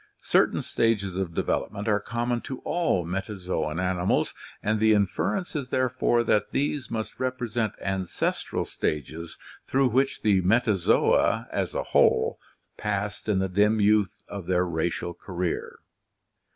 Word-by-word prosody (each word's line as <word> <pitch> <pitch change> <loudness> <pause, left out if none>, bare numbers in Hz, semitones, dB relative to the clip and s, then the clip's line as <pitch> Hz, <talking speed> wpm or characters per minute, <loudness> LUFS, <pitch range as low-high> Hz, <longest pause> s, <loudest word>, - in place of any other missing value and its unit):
Certain - - +3
stages 100 -5 0
of 95 -3 -3
development 100 +2 -1
are 105 -1 +3
common 120 +3 -2
to 130 - -6
all 165 - 0
metazoan 90 -3 -3
animals 90 0 +1 0.3
and 110 +1 +1
the 110 0 +5
inference 105 - 0
is 140 -4 -3
therefore 125 -2 +2
that 105 -2 +2
these 145 -1 -1
must 110 -1 -4
represent 120 -3 -1
ancestral 95 -2 -2
stages 80 +3 -3 0.3
through 135 -1 +3
which 135 +4 +1
the 100 -3 +4
Metazoa 105 -1 +3
as - - -2
a - - 0
whole - - +3 0.4
passed 105 +1 -3
in 105 - +3
the 95 0 +1
dim 105 +4 +3
youth 105 -2 +2
of 100 -4 -7
their 90 0 +2
racial 85 +1 -2
career. 90 0 -4
105 Hz, 135 wpm, -26 LUFS, 90-120 Hz, 0.4 s, the